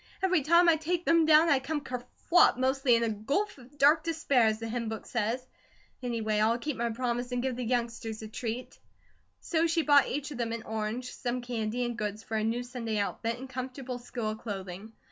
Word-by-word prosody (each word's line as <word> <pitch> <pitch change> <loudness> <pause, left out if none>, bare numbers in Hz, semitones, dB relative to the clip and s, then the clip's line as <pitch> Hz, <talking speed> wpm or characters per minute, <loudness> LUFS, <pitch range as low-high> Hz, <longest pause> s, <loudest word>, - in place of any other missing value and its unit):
Every 370 -4 +3
time 340 +5 +5
I 330 -1 +6
take 345 +3 -2
them, 330 -1 +4
down 315 +1 +7
I 285 -4 +4
come 295 +3 -2
kerflop, 250 +7 +2
mostly 260 -1 +3
in 230 - +2
a 230 - +1
'gulf 275 - -2
of 260 +4 -17
dark 295 +3 +5
despair,' 290 -8 +2
as 215 0 +1
the 225 0 -5
hymn 230 0 -3
book 220 -1 -6
says. 240 +2 -2 0.6
Anyway, 225 -4 -1
I'll 225 +2 +3
keep 290 +3 -3
my 235 0 -1
promise 245 +1 -2
and 245 0 -1
give 260 -2 -1
the 250 - -4
youngsters 230 -2 -2
a - - -6
treat." 235 +1 -5 0.6
So 330 -1 +1
she 330 0 +1
bought 290 -2 +5
each 290 +2 -3
of 265 - -7
them 230 -1 -1
an 230 -1 -5
orange, 220 +3 -4
some 245 0 -3
candy, 240 0 -2
and 240 0 -3
goods 210 -1 -4
for 220 - -5
a 215 - +1
new 230 +3 0
Sunday 240 -3 -4
outfit 225 +3 -2
and 260 +2 -8
comfortable 255 0 -5
school 235 -3 -4
clothing. 200 -1 -7
245 Hz, 210 wpm, -29 LUFS, 225-280 Hz, 0.6 s, down